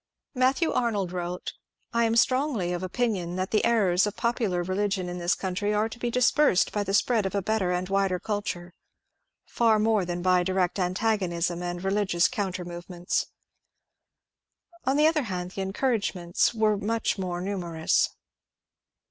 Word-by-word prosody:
Matthew 265 Hz, +5 st, +2 dB
Arnold 205 Hz, -7 st, 0 dB
wrote, 180 Hz, 0 st, -4 dB, 0.2 s
" -, -, -44 dB
I 235 Hz, 0 st, +3 dB
am 225 Hz, 0 st, +1 dB
strongly 245 Hz, -7 st, +2 dB
of 175 Hz, -, -3 dB
opinion 185 Hz, -3 st, -1 dB
that 185 Hz, 0 st, -2 dB
the 215 Hz, -, +2 dB
errors 200 Hz, -5 st, +3 dB
of 210 Hz, -, -4 dB
popular 220 Hz, -7 st, 0 dB
religion 190 Hz, 0 st, -1 dB
in 175 Hz, 0 st, -5 dB
this 175 Hz, +1 st, +1 dB
country 200 Hz, +2 st, -2 dB
are 215 Hz, +1 st, +2 dB
to 230 Hz, +1 st, -10 dB
be 240 Hz, -, -1 dB
dispersed 250 Hz, -3 st, +3 dB
by 210 Hz, -, -1 dB
the 195 Hz, 0 st, 0 dB
spread 220 Hz, -2 st, +2 dB
of 190 Hz, -, -5 dB
a 200 Hz, -, +1 dB
better 205 Hz, -3 st, 0 dB
and 180 Hz, +1 st, -1 dB
wider 195 Hz, -1 st, +1 dB
cidture, 205 Hz, -4 st, -4 dB, 0.7 s
far 225 Hz, -2 st, +2 dB
more 215 Hz, -2 st, +2 dB
than 175 Hz, 0 st, -4 dB
by 185 Hz, -1 st, +4 dB
direct 185 Hz, +1 st, 0 dB
antagonism 180 Hz, -2 st, 0 dB
and 175 Hz, 0 st, -4 dB
reli 200 Hz, +2 st, 0 dB
gious 175 Hz, -1 st, +3 dB
coimter 190 Hz, -6 st, -3 dB
movements." 175 Hz, 0 st, -3 dB, 1.6 s
On 270 Hz, +2 st, +2 dB
the 300 Hz, -, +5 dB
other 310 Hz, -4 st, +2 dB
hand, 180 Hz, -1 st, -4 dB
the 195 Hz, -, -5 dB
encourage 205 Hz, +2 st, -1 dB
ments 175 Hz, -1 st, +1 dB
were 215 Hz, -2 st, +2 dB
much 220 Hz, 0 st, -1 dB
more 180 Hz, -2 st, -3 dB
numerous. 175 Hz, -4 st, 0 dB
195 Hz, 165 wpm, -26 LUFS, 180-225 Hz, 1.6 s, the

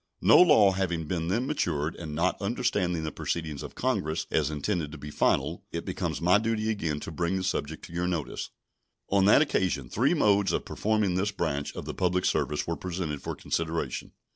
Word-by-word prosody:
No -, -, +7 dB
law 130 Hz, -, +6 dB
having 90 Hz, -4 st, -1 dB
been 80 Hz, +1 st, -2 dB
then 115 Hz, +8 st, 0 dB
matured, 85 Hz, -, -1 dB
and 80 Hz, -3 st, -6 dB
not 90 Hz, +6 st, 0 dB
understanding 100 Hz, -6 st, 0 dB
the 80 Hz, -, -3 dB
proceedings 80 Hz, -4 st, -3 dB
of -, -, -8 dB
Congress 80 Hz, +2 st, -1 dB
as 75 Hz, -2 st, +2 dB
intended 75 Hz, +1 st, -2 dB
to 80 Hz, -, -8 dB
be 75 Hz, +1 st, -8 dB
final, -, -, +1 dB
it -, -, -4 dB
becomes -, -, -3 dB
my 90 Hz, +4 st, +4 dB
duty 110 Hz, 0 st, 0 dB
again 80 Hz, -8 st, -2 dB
to -, -, -6 dB
bring 85 Hz, +3 st, -1 dB
the 95 Hz, -, -1 dB
subject 80 Hz, -4 st, -3 dB
to 85 Hz, -, -12 dB
your 90 Hz, +1 st, -1 dB
notice. 85 Hz, -5 st, -3 dB, 0.6 s
On 100 Hz, -1 st, +3 dB
that 110 Hz, +9 st, +7 dB
occasion 75 Hz, -, -1 dB
three 130 Hz, -, +2 dB
modes 100 Hz, -, +3 dB
of -, -, -1 dB
performing 105 Hz, -3 st, 0 dB
this 95 Hz, +3 st, +1 dB
branch 80 Hz, -8 st, -2 dB
of -, -, -6 dB
the -, -, -4 dB
public 90 Hz, -1 st, 0 dB
service 75 Hz, -, 0 dB
were 85 Hz, -, -2 dB
presented 85 Hz, -6 st, -4 dB
for -, -, -4 dB
consideration. 85 Hz, 0 st, -3 dB
90 Hz, 195 wpm, -28 LUFS, 80-100 Hz, 0.6 s, No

